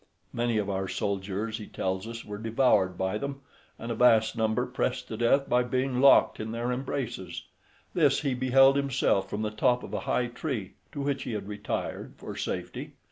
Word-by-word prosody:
Many 120 -1 0
of 105 -2 0
our 95 -1 -2
soldiers, 100 +2 -2
he 105 - -8
tells 95 +3 -3
us, 115 0 -7
were 105 0 -6
devoured 110 -5 +2
by 95 +3 -1
them, 140 +1 -5 0.4
and 115 - -5
a - - +1
vast 115 -1 +4
number 110 -1 +1
pressed - - -2
to - - -4
death 135 +4 +3
by 125 0 +3
being 130 +1 0
locked 140 - +6
in 110 0 -4
their 120 +2 -2
embraces: 125 -8 -4 0.5
this - - +3
he 140 - 0
beheld 135 +2 +5
himself 130 -8 +1
from 105 +1 -3
the 105 - -1
top 120 +3 +2
of - - -9
a - - -1
high 125 - +2
tree, 120 - -4 0.2
to 145 - -5
which 140 -1 -1
he 120 - -4
had 100 -2 -4
retired 105 +1 -4
for - - -8
safety. - - -4
115 Hz, 190 wpm, -28 LUFS, 105-130 Hz, 0.5 s, locked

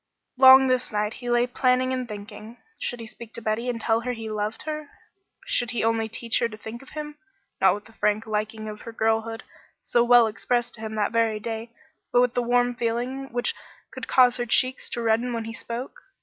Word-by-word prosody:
Long 265 +1 +9
this 255 -1 +1
night 210 0 -1
he 245 - -4
lay 240 0 +3
planning 255 +1 +1
and 255 -1 -2
thinking. 215 +2 -9 0.2
Should 245 - -3
he - - -7
speak 225 0 -11
to 230 - -5
Betty 220 +3 -1
and 235 -2 -2
tell 225 0 +2
her 250 +1 -2
he 225 -2 -6
loved 215 +1 -3
her? 305 -1 -5 0.6
Should 245 - 0
he 230 -2 -1
only 225 0 +1
teach 230 0 -1
her 235 - +1
to 215 - -10
think 220 +2 -8
of 270 - -15
him, 300 0 -6 0.4
not 190 -1 +5
with 205 - -10
the 225 - -17
frank 210 0 0
liking 215 0 -3
of 210 0 -7
her 230 - -8
girlhood, 225 +1 0 0.4
so 240 - +3
well 240 -1 +7
expressed 240 +2 -1
to 220 - -8
him 220 0 -5
that 210 -1 0
very 225 -2 +1
day, 225 +1 -5 0.4
but 245 - +4
with 250 -1 +2
the 245 - +1
warm 245 0 +2
feeling 245 +3 -2
which 245 +1 0 0.4
would - - -7
cause 250 -1 +5
her 240 0 -2
cheeks 255 +3 +2
to 235 - -3
redden 230 +2 +1
when 230 -1 -3
he 225 - -6
spoke? 235 +3 -6
230 Hz, 220 wpm, -25 LUFS, 220-245 Hz, 0.6 s, Long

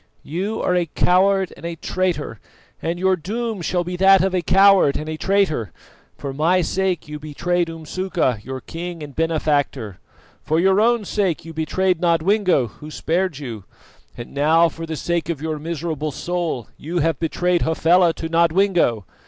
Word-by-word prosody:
You 195 +8 -3
are 180 - +1
a 175 -1 +1
coward 190 +3 +2
and - - -16
a 170 0 -4
traitor, 170 - -2 0.4
and 165 +2 -2
your 190 +1 +2
doom 215 +4 -4
shall 175 +1 0
be 180 +1 -5
that 195 0 +6
of 190 -1 0
a 180 - +1
coward 195 -4 +5
and 155 - -6
a 155 - -3
traitor. 155 - 0 0.5
For 140 -2 -5
my 165 +6 +2
sake 185 -2 -1
you 150 0 -7
betrayed 170 +3 -1
Umsuka, 165 - -2
your 130 +3 -6
king 170 -1 -7
and 145 -3 -10
benefactor; 145 - -1 0.4
for 160 +1 0
your 190 +3 +4
own 235 -1 +2
sake 190 -6 -1
you 165 - -8
betrayed 180 +3 0
Nodwengo, 175 - +2
who 150 +9 -12
spared 170 +1 -1
you; 115 -9 -7 0.5
and 120 - -9
now, 160 +4 +4
for 165 0 -8
the 160 - -4
sake 170 +1 -2
of 165 -5 -2
your 155 0 -3
miserable 155 -1 -3
soul, 170 -6 -3
you 165 +4 -5
have 165 -3 +1
betrayed 175 +2 0
Hafela 170 +2 +3
to 165 - -5
Nodwengo. 170 - +2
170 Hz, 170 wpm, -21 LUFS, 155-185 Hz, 0.5 s, that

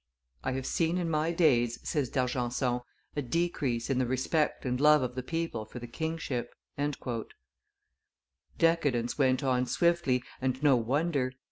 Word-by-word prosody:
"I 130 - -1
have 130 0 -3
seen 165 +1 +1
in 170 -2 -1
my 155 +1 +1
days," 120 -9 +3
says 145 -6 0
D'Argenson, 125 -1 0 0.4
"a 145 - 0
decrease 135 -4 -1
in 135 -2 +1
the 130 - +1
respect 130 +5 0
and 125 +1 -1
love 150 -2 +6
of 125 -1 -2
the 130 - -3
people 165 -5 -3
for 110 +3 -11
the 120 - -6
kingship." 155 -1 -3 2.0
Decadence 145 -8 +2
went 130 -1 +3
on 125 -1 +1
swiftly, 130 -2 +2 0.2
and 130 +1 -1
no 145 -3 +6
wonder. 130 +2 0
130 Hz, 145 wpm, -30 LUFS, 125-160 Hz, 2.0 s, love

